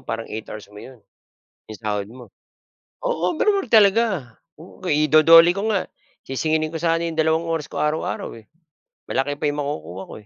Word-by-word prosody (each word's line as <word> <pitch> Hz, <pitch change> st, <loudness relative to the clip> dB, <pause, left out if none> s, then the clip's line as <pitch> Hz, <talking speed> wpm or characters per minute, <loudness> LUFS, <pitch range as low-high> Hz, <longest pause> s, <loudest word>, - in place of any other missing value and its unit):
parang 115 Hz, 0 st, -5 dB
8 110 Hz, 0 st, -7 dB
hours 105 Hz, -2 st, -8 dB
mo 105 Hz, -, -11 dB
yun. 130 Hz, -2 st, -13 dB, 0.7 s
Yung 110 Hz, -, -9 dB
sahod 105 Hz, -2 st, -3 dB
mo 125 Hz, -1 st, -12 dB, 0.7 s
oo, 175 Hz, +3 st, -1 dB
overall 400 Hz, +4 st, +1 dB
talaga. 200 Hz, -, +3 dB, 0.2 s
Oo, 185 Hz, +2 st, -14 dB
ido-DOLE 165 Hz, +3 st, +6 dB
ko 215 Hz, +2 st, -1 dB
nga. 195 Hz, -3 st, -1 dB, 0.4 s
Sisingilin 155 Hz, +3 st, 0 dB
ko 165 Hz, -, -7 dB
sana 165 Hz, 0 st, 0 dB
yung 165 Hz, -1 st, -3 dB
dalawang 160 Hz, +1 st, +1 dB
oras 165 Hz, -2 st, -1 dB
ko -, -, -6 dB
araw-araw 150 Hz, -5 st, -2 dB
eh. 110 Hz, -, -14 dB, 0.6 s
Malaki 145 Hz, +2 st, -2 dB
pa -, -, -2 dB
yung 145 Hz, 0 st, -1 dB
makukuha 90 Hz, -, -5 dB
ko -, -, -8 dB
155 Hz, 170 wpm, -22 LUFS, 125-170 Hz, 0.7 s, ido-DOLE